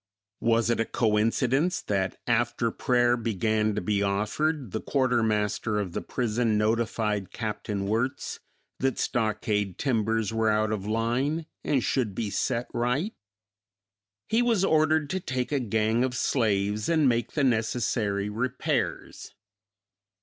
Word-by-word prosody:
Was 115 0 +2
it 115 - 0
a 115 - +2
coincidence 125 - +1
that 95 -2 -1
after 120 -1 +1
prayer 120 0 +2
began 110 -2 0
to - - -1
be 100 +2 0
offered 110 - 0
the 110 - -3
quartermaster 110 -5 +1
of 95 -4 -3
the - - -3
prison 115 -2 0
notified 105 -2 0
Capt. 110 -1 -5
Wirtz 105 +5 -1 0.4
that 135 -1 0
stockade 105 -4 -1
timbers 110 -4 0
were 110 -1 +2
out 110 0 +1
of 105 -2 -3
line 120 +9 0 0.2
and 135 -4 +1
should 115 -8 0
be 105 -2 -2
set 120 +2 -1
right? 125 - 0 1.1
He 225 +2 +2
was 230 -6 +2
ordered 155 -1 +3
to 190 - -1
take 130 -7 -3
a 145 - +2
gang 110 0 +1
of 130 -1 -1
slaves 105 -4 +1
and 160 -4 +3
make 120 -1 0
the 145 - +1
necessary 110 -4 0
repairs. 115 +4 -2
115 Hz, 135 wpm, -27 LUFS, 105-130 Hz, 1.1 s, ordered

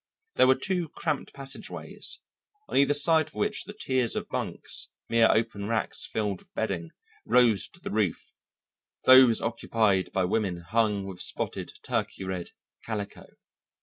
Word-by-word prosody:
There - - +5
were 130 - +6
two 175 +4 -2
cramped 155 -2 -3
passageways, 135 -1 -4 0.5
on - - -6
either 140 +1 +5
side 155 +2 +4
of 155 - -17
which 210 +1 -1
the 205 - -8
tiers 130 -3 0
of - - -3
bunks, - - -2 0.2
mere 115 -1 +5
open 110 -3 0
racks 110 -1 -2
filled 105 -4 -2
with - - -24
bedding, 90 -7 -2 0.3
rose 120 -3 +4
to 175 - -18
the - - -6
roof, 105 -5 -1 0.7
those 130 -3 +8
occupied 110 -4 +1
by 95 -1 +1
women 95 -3 -1
hung 105 +2 0
with 95 -2 -6
spotted - - -3
turkey - - -2
red 95 -2 -4 0.3
calico. 105 -3 -5
115 Hz, 150 wpm, -27 LUFS, 100-135 Hz, 0.7 s, those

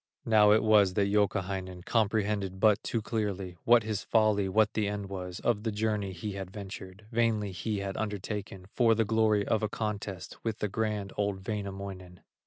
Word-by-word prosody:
Now 105 -2 +5
it 110 +1 +5
was 105 -4 +5
that 100 -1 +2
Youkahainen 95 -3 -1
Comprehended 105 -3 0
but 105 0 +4
too 115 -2 -2
clearly 100 -5 -3
What 120 -1 +6
his 105 -1 -2
folly, 105 -3 +2
what 110 +2 +3
the 105 -2 0
end 100 -1 -4
was, 90 -2 -5
Of 115 -4 +1
the 110 0 -2
journey 105 -2 -1
he 95 +4 -5
had 95 -2 -6
ventured, 95 0 -9
Vainly 110 -3 +1
he 105 +4 -3
had 95 -1 -4
undertaken 100 -2 -4
For 115 -2 +4
the 115 0 +2
glory 110 -1 +2
of 110 - +1
a 110 - 0
contest 105 -4 -4
With 110 -2 -2
the 105 - -2
grand, 105 -2 -2
old 100 -2 -2
Wainamoinen. 95 -3 -5
105 Hz, 180 wpm, -30 LUFS, 95-110 Hz, -, What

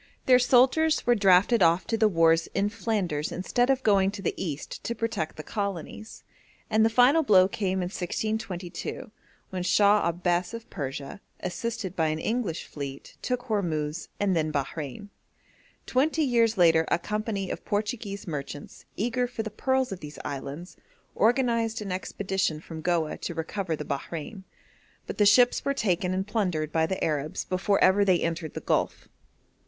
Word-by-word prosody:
Their 250 -1 +6
soldiers 260 +6 +4
were 240 - +5
drafted 200 +1 +4
off 170 +1 +4
to 230 - -1
the 220 -1 +4
wars 165 -3 +3
in 200 +1 +1
Flanders 185 -10 -2
instead 245 +7 0
of 265 -1 +2
going 195 -3 +4
to 200 0 -7
the - - 0
East 150 -5 -5
to 235 - -2
protect 225 -8 -3
the 155 - -6
colonies; 200 +2 -5 0.5
and 220 0 +4
the 225 - +4
final 250 +7 +5
blow 190 -9 +5
came 190 -2 -1
in 175 - -3
1622, 190 0 -4 0.4
when 185 -1 -3
Shah 200 +1 +4
Abbas 175 +4 -1
of 230 0 -9
Persia, 140 +5 -5 0.2
assisted 190 0 -4
by 160 -2 +1
an 155 0 -1
English 215 -2 -2
fleet, 140 -2 -8
took 250 -1 -2
Hormuz, 170 -8 -2
and 200 -2 +1
then 155 -1 0
Bahrein. 145 +6 -4 0.8
Twenty 305 +5 +1
years 230 -5 +2
later 165 -2 +5
a - - +2
company 210 0 -3
of - - -6
Portuguese 205 -1 -3
merchants, 145 -2 -7
eager 245 +3 0
for 240 -2 -4
the 220 - -6
pearls 260 +3 0
of 190 - -5
these 150 -2 -9
islands, 145 +4 -6 0.4
organised 230 -1 +2
an 205 -3 -5
expedition 190 -2 -2
from 160 0 -9
Goa 165 -2 0
to 170 - -5
recover 165 +1 -3
the 150 - -6
Bahrein, 165 +8 -5 0.6
but - - -7
the 205 - +6
ships 245 +4 +5
were 280 - 0
taken 185 -5 0
and 190 +1 -1
plundered 180 -8 -1
by 160 0 +2
the 190 - -3
Arabs 150 -1 -2
before 195 +2 +1
ever 200 +2 +5
they 185 -3 +3
entered 165 -2 -3
the - - -4
Gulf. - - -1
195 Hz, 165 wpm, -27 LUFS, 165-225 Hz, 0.8 s, Their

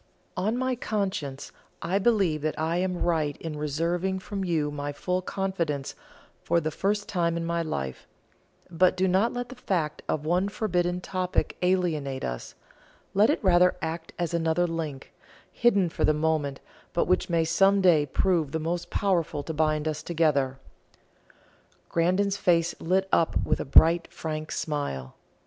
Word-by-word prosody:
On 215 +5 0
my 260 0 0
conscience 195 - -3 0.3
I 180 +4 0
believe 195 -8 +2
that 155 +1 -2
I 160 +2 0
am 180 0 -1
right 155 -4 0
in 160 -2 -6
reserving 165 +6 -1
from 195 +1 -5
you 160 -5 0
my 145 0 -4
full 180 +5 -2
confidence 175 -8 -2 0.5
for 170 - +2
the 155 -1 -2
first 205 +5 -1
time 170 -3 0
in 165 - -2
my 170 0 0
life; 70 - -4 0.6
but 180 +2 +3
do 190 +1 +2
not 190 +6 +2
let 245 0 -4
the 255 - -9
fact 175 -10 -2
of 150 -1 -1
one 180 +5 +1
forbidden 180 -4 -1
topic 185 0 -1
alienate 165 -7 0
us - - -5 0.6
let 205 +3 +4
it 295 - 0
rather 180 -1 +5
act 165 +1 -4
as 175 -1 -2
another 165 +1 +1
link, 160 -5 -5 0.4
hidden 200 -6 +3
for 165 - -3
the 155 - +4
moment, 150 -3 0 0.3
but 170 - +2
which 185 +1 +1
may 165 -1 +2
some 195 +4 +4
day 165 -6 +4
prove 165 -2 +1
the 160 - 0
most 170 +2 -3
powerful 170 -7 0
to 160 - -5
bind 155 0 +1
us 155 -1 -2
together." 150 -6 +1 1.3
Grandon's 185 +4 +1
face 170 -3 +2
lit 190 +3 +1
up 165 - +2
with - - +1
a - - -3
bright 165 +5 +5
frank 155 -1 -5
smile. 70 - -3
170 Hz, 160 wpm, -27 LUFS, 155-185 Hz, 1.3 s, rather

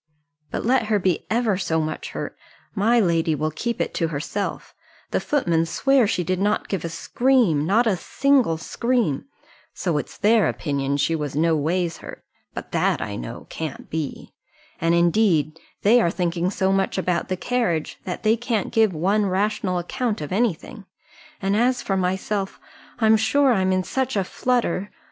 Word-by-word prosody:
"But - - -4
let 245 -2 +2
her 215 -1 +2
be 185 -3 0
ever 220 -4 +1
so 160 -4 0
much 155 0 -3
hurt, - - -5 0.4
my 225 +4 +3
lady 165 -5 +2
will 155 +2 -1
keep 235 +9 -3
it - - -1
to 165 - 0
herself: 165 +6 -4 0.4
the - - +1
footmen 170 - +1
swear 270 +5 +3
she 180 - 0
did 185 +2 -1
not 205 +2 0
give 195 -5 -3
a 170 - -3
scream, 190 - +2
not 225 +6 +3
a 215 -4 +2
single 260 - +2
scream; 230 - -1 0.5
so 170 -5 0
it's - - -8
their 215 0 +4
opinion 140 -2 -1
she 165 +3 +1
was 150 -3 -4
no 165 +2 +3
ways 165 +3 -1
hurt - - -10 0.3
but - - -7
that, - - +1
I - - -4
know, - - -7
can't 160 -3 -6
be 155 -3 -5 0.5
and, 165 +1 +2
indeed, 170 -3 +2 0.2
they 235 +4 +6
are 170 - +2
thinking 175 0 -1
so 190 -1 0
much 195 0 0
about 180 -2 0
the 185 - -2
carriage, 180 -7 -1
that 180 +3 -5
they 220 0 +4
can't 235 -3 -2
give 220 -5 +3
one 195 +7 +2
any 200 - 0
rational 190 -1 0
account 220 +5 -2
of 150 - -6
any 210 -1 +2
thing; 210 +5 -12 0.6
and, 195 +1 +1
as 245 +3 +2
for 195 - -1
myself, 190 +2 -2 0.4
I'm 220 -2 +4
sure 255 +5 +3
I'm 190 -3 +1
in 185 0 +1
such 265 +4 -2
a 195 - +2
flutter. 210 -3 -1
190 Hz, 180 wpm, -23 LUFS, 165-225 Hz, 0.6 s, they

